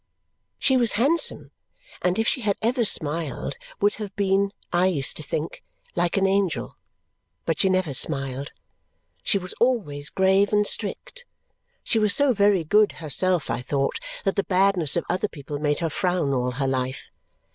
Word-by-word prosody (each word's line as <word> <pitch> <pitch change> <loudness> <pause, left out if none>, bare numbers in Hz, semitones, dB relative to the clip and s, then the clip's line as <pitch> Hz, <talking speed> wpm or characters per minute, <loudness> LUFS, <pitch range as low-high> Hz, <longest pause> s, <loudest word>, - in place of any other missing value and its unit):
She 265 -1 +3
was 235 -3 +3
handsome; 285 +10 +2 0.5
and 180 0 0
if 225 +1 0
she 265 - 0
had 205 -3 0
ever 235 +1 +1
smiled, 150 - 0 0.2
would 205 +1 +2
have 205 -2 -6
been 195 0 +1 0.2
(I 175 +2 +3
used 145 -8 0
to - - 0
think) 155 +1 -4 0.3
like 175 +2 0
an 195 - +3
angel 195 -5 0 0.7
but 165 - -1
she 190 - +3
never 185 -6 0
smiled. 135 -1 0 0.7
She - - +2
was 185 -2 -5
always 155 - 0
grave 190 +3 +2
and 210 0 +3
strict. - - -2 0.6
She 225 - +1
was 210 -1 +4
so 285 -3 +3
very 200 -4 +3
good 210 +6 +3
herself, 170 +2 -1
I 120 - -2
thought, 135 +2 -1 0.3
that 195 - 0
the 200 - +2
badness 185 -5 +2
of 170 - -1
other 200 +3 -1
people 145 -4 -7
made 145 +1 0
her 165 - 0
frown 175 -5 0
all 125 -1 -1
her 135 +2 -2
life. 130 0 -3
185 Hz, 170 wpm, -24 LUFS, 145-205 Hz, 0.7 s, was